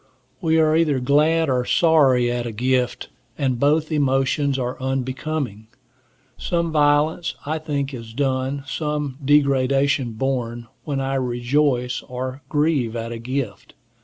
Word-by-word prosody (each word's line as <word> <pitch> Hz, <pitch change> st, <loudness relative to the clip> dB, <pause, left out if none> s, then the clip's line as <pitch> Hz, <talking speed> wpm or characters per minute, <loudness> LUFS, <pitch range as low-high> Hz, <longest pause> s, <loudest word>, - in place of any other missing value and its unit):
We 160 Hz, -2 st, +2 dB
are 155 Hz, -1 st, +3 dB
either 155 Hz, -5 st, +2 dB
glad 150 Hz, +5 st, +3 dB
or 125 Hz, -2 st, +1 dB
sorry 135 Hz, -6 st, +3 dB
at 120 Hz, 0 st, -2 dB
a -, -, -4 dB
gift, 125 Hz, +3 st, -1 dB, 0.3 s
and 130 Hz, -4 st, 0 dB
both 155 Hz, +3 st, +2 dB
emotions 140 Hz, -1 st, +1 dB
are 125 Hz, 0 st, -3 dB
unbecoming. 130 Hz, -3 st, -3 dB, 0.7 s
Some 170 Hz, -1 st, -1 dB
violence, 150 Hz, +2 st, +2 dB
I 155 Hz, +2 st, -2 dB
think, 145 Hz, -3 st, -3 dB
is 115 Hz, -3 st, -8 dB
done, 135 Hz, 0 st, -1 dB
some 150 Hz, -2 st, -3 dB
degradation 135 Hz, -2 st, +2 dB
borne, 120 Hz, -1 st, -2 dB, 0.2 s
when 140 Hz, -3 st, -2 dB
I 135 Hz, 0 st, -2 dB
rejoice 125 Hz, 0 st, 0 dB
or 130 Hz, +2 st, -6 dB
grieve 145 Hz, -6 st, +1 dB
at 115 Hz, 0 st, -4 dB
a 115 Hz, -, -5 dB
gift. 130 Hz, +3 st, -5 dB
135 Hz, 135 wpm, -22 LUFS, 125-150 Hz, 0.7 s, are